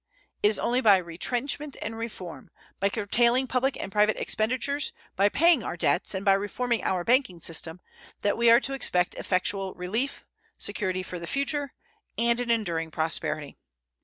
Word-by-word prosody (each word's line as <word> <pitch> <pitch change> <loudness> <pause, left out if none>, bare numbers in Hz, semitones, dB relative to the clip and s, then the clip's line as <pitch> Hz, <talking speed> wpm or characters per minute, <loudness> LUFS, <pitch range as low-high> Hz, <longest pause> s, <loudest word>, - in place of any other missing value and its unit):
It - - +5
is 210 - +1
only 245 +2 +1
by 205 -5 +6
retrenchment 245 - -2
and 225 +1 -5
reform 185 - -7 0.3
by 200 - +2
curtailing 235 +5 +2
public 260 +1 0
and 195 - -5
private 210 +1 +3
expenditures, 255 +6 0 0.2
by 200 +2 +4
paying 330 +2 +5
our - - -4
debts, 180 - +1
and 190 +2 -4
by 195 - +6
reforming 230 +5 -1
our 180 -2 0
banking 235 -6 +2
system 165 +1 -2 0.4
that 205 - +1
we 235 0 +4
are 230 +1 +8
to 275 - -2
expect 180 -9 +1
effectual 190 +1 -1
relief, 220 +10 -3 0.3
security 185 -3 -2
for 180 -1 -7
the 170 - -7
future, 280 - -2 0.4
and 235 +1 +2
an 245 -1 -3
enduring 170 -8 0
prosperity. 155 -2 -2
210 Hz, 160 wpm, -27 LUFS, 185-245 Hz, 0.4 s, are